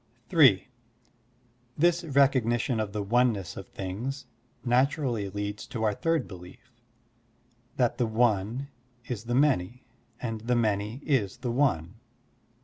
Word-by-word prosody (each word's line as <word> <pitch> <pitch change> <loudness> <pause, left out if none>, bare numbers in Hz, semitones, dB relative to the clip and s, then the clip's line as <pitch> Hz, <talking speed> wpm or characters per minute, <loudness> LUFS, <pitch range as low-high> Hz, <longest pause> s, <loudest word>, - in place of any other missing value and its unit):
(3) 135 - +5 1.1
This 175 +2 +3
recognition 130 -5 +2
of 105 -2 -2
the 105 0 -3
oneness 115 -3 +1
of - - -8
things 120 +9 -5 0.4
naturally 125 -4 +1
leads 105 +1 -5
to 110 - -4
our 105 -1 +2
third 165 +4 0
belief, 90 +6 -12 1.1
that 125 -1 +1
the 120 - +2
one 110 +3 +1 0.4
is 115 -2 -5
the 120 +1 -1
many 125 -5 +1 0.3
and 115 -3 -4
the 120 +2 0
many 110 +3 -1
is 120 -10 +1
the 125 -2 -3
one. 110 - 0
120 Hz, 125 wpm, -28 LUFS, 105-135 Hz, 1.1 s, 3